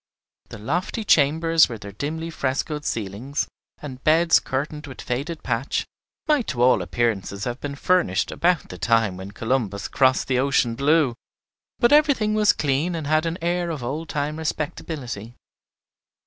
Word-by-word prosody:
The 115 - -8
lofty 175 - -2
chambers, 160 -1 +4
with 115 -3 -7
their 100 - -7
dimly 160 +9 -4
frescoed 150 +1 -2
ceilings, 115 +7 -3 0.4
and 130 -3 -8
beds 165 +2 +5
curtained 150 +3 -4
with 130 - -10
faded 145 +7 -4
patch, 120 +2 -1 0.4
might 300 -6 +2
to 120 -2 0
all 130 - +5
appearances 100 -4 -1
have 120 +3 -4
been 140 -1 -4
furnished 140 - +1
about 175 -2 +1
the 90 - -9
time 115 -2 +2
when 95 +1 -8
"Columbus 110 -2 -2
crossed 130 -1 +2
the 130 -1 +1
ocean 130 -3 +2
blue;" 140 +1 +3 0.6
but 240 +2 +4
everything 285 -8 +4
was 210 -1 +5
clean, 150 +5 0
and 160 -2 -4
had 155 +2 +2
an 165 +1 -2
air 175 0 0
of 155 -6 -4
old 150 +7 -4
time 150 +1 -2
respectability. 145 -7 -4
140 Hz, 155 wpm, -23 LUFS, 120-165 Hz, 0.6 s, beds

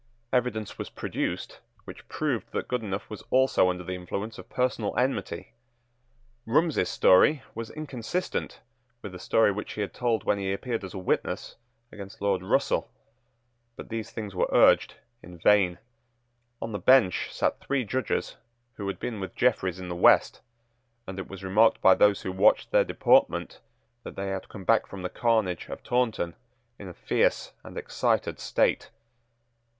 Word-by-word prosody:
Evidence 120 -4 -1
was - - -5
produced - - -4 0.3
which - - -11
proved - - -2
that - - -3
Goodenough 110 -5 -3
was 105 - -9
also 130 -7 +3
under 90 0 -3
the 90 - -5
influence 100 +5 -5
of - - -12
personal 125 -4 -1
enmity. 130 +2 -2 0.9
Rumsey's 150 - +2
story 130 +10 +5
was 115 -1 -6
inconsistent 155 +3 -4 0.4
with 100 - -6
the 90 - -9
story 110 +3 +3
which 105 +1 -5
he 105 - -4
had 100 - -3
told 120 -3 0
when 100 - +1
he 95 0 -1
appeared 115 +1 -3
as 95 +1 -8
a - - -4
witness 95 - -2 0.4
against 100 +1 -10
Lord 100 -2 0
Russell. 95 - 0 0.9
But - - -10
these 115 -1 -4
things 105 -4 -6
were 90 - 0
urged - - +5 0.3
in 90 0 -12
vain. 90 0 +3 0.9
On 115 - -4
the 105 - -3
bench 130 -9 +4
sate - - -1
three 140 -2 -1
judges 130 +5 -2 0.4
who 100 - -4
had 100 - -4
been 115 -4 -4
with 95 -3 -6
Jeffreys 95 -7 +1
in 90 - -7
the 90 - -4
West; 85 - +4 0.6
and 95 0 -7
it - - -6
was 95 0 -9
remarked 105 +4 +4
by 95 - +7
those 105 0 +3
who 95 - -3
watched 95 +3 +3
their - - +5
deportment - - +2 0.4
that - - -9
they 100 0 -3
had 95 -1 -5
come 100 - -9
back 115 +3 +3
from 95 -2 -8
the 90 - -2
carnage 110 -7 0
of - - -7
Taunton 115 -9 0 0.5
in 100 - -8
a 90 - -8
fierce - - 0
and - - -10
excited - - -1
state. - - 0
105 Hz, 165 wpm, -27 LUFS, 95-115 Hz, 0.9 s, by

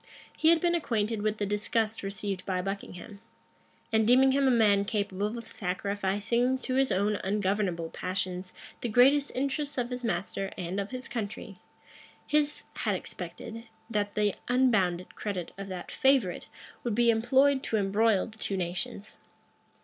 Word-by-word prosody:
He 320 - +4
had 335 0 +6
been 345 +1 +2
acquainted 225 -9 0
with 215 0 0
the 205 - -1
disgust 215 +2 0
received 195 -1 -4
by 185 -2 -1
Buckingham; 195 +1 -6 0.7
and 220 -1 +4
deeming 260 +2 +6
him 275 0 +3
a - - +5
man 210 -5 +4
capable 205 0 -2
of 230 - -7
sacrificing 205 +5 0
to 260 0 -4
his 270 0 +2
own 205 +2 +1
ungovernable 195 -4 -1
passions 185 0 -3 0.3
the 240 - -2
greatest 275 +5 +5
interests 280 +2 -2
of 245 0 -1
his 250 0 -4
master 195 -3 -2
and 180 +1 -3
of 200 +1 -3
his 255 0 -4
country, 210 -4 -5 0.7
his 300 0 +1
had - - 0
expected, 230 +1 -7 0.3
that 205 -2 -1
the 210 -2 +2
unbounded 215 -9 +2
credit 190 -5 -4
of 195 +1 -7
that 185 -2 -6
favorite 265 -9 +2 0.4
would 235 -4 -1
be 235 0 +5
employed 265 +5 +3
to 225 - -1
embroil 205 0 +2
the 220 -1 -13
two 195 - -2
nations. 180 +3 -4
210 Hz, 155 wpm, -29 LUFS, 195-245 Hz, 0.7 s, had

